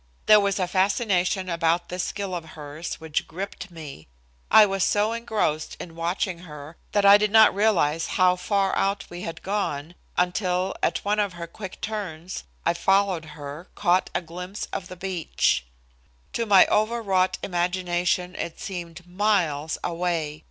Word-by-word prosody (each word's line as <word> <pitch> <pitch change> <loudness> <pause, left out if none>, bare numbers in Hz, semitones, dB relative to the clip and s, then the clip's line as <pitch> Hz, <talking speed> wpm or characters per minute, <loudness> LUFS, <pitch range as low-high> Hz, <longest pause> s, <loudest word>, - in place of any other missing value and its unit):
There 215 0 +8
was 200 -1 +1
a 185 -2 0
fascination 190 -1 +1
about 170 0 +1
this 180 0 -2
skill 200 -2 -4
of 175 -2 -3
hers 150 +3 -6
which 160 -2 -3
gripped 190 +2 -6
me. 155 - -10 0.4
I 215 - +8
was 195 -2 0
so 210 +3 +2
engrossed 215 -10 -1
in 165 -2 -8
watching 170 +2 -2
her 150 -2 -10 0.2
that 205 -1 +3
I 200 +1 +9
did 210 0 +2
not 220 +1 +7
realize 170 -7 +2
how 185 -1 +5
far 195 +1 0
out 195 +1 0
we 175 0 -7
had 165 -2 -6
gone 175 -6 -2 0.2
until 180 +1 +1
at - - 0
one 210 +1 +1
of 200 -3 0
her 170 -1 -6
quick 185 +3 -9
turns, 185 -5 -5 0.2
I, 170 - +3
following 185 -3 +1
her, 145 +5 -8
caught 185 -2 +2
a - - +1
glimpse 180 +4 -6
of 180 - -4
the 185 - -9
beach. 175 - 0 0.7
To 230 - -1
my 195 -2 +8
overwrought 210 -4 +1
imagination 180 0 0
it 170 - -5
seemed 175 -2 -7
miles 175 -6 0
away. 165 -3 -2
180 Hz, 160 wpm, -25 LUFS, 170-200 Hz, 0.7 s, I